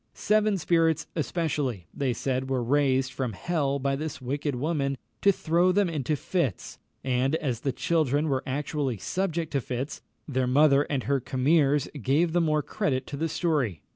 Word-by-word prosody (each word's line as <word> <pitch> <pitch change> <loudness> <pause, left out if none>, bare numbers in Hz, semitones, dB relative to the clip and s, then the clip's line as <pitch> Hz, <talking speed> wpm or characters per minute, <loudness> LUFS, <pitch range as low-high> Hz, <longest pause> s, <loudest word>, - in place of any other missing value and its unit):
Seven 215 -1 +2
spirits 165 -2 +2
especially, 145 - -1
they 135 -3 0
said, 130 +2 -2
were 130 -2 0
raised 135 0 +2
from 125 -4 -3
hell 140 - -1
by 140 0 0
this 150 -1 -5
wicked 140 +2 -2
woman 140 0 -1 0.2
to 200 - +6
throw 175 0 +2
them 200 +1 +2
into 155 -2 -1
fits; 145 - -2 0.2
and 130 +3 +1
as 130 -8 -2
the 135 - -1
children 150 +1 +1
were 135 -3 0
actually 140 -2 -2
subject 170 - -2
to 140 - 0
fits, 130 +4 -4 0.3
their 130 -3 0
mother 140 +2 +4
and 140 -3 -1
her 140 0 +1
commeres 140 +2 +2
gave 155 +8 +2
the 175 - +3
more 155 -2 +1
credit 145 -12 -1
to - - -6
the 160 +3 -1
story. 145 - -1
140 Hz, 170 wpm, -27 LUFS, 130-160 Hz, 0.3 s, to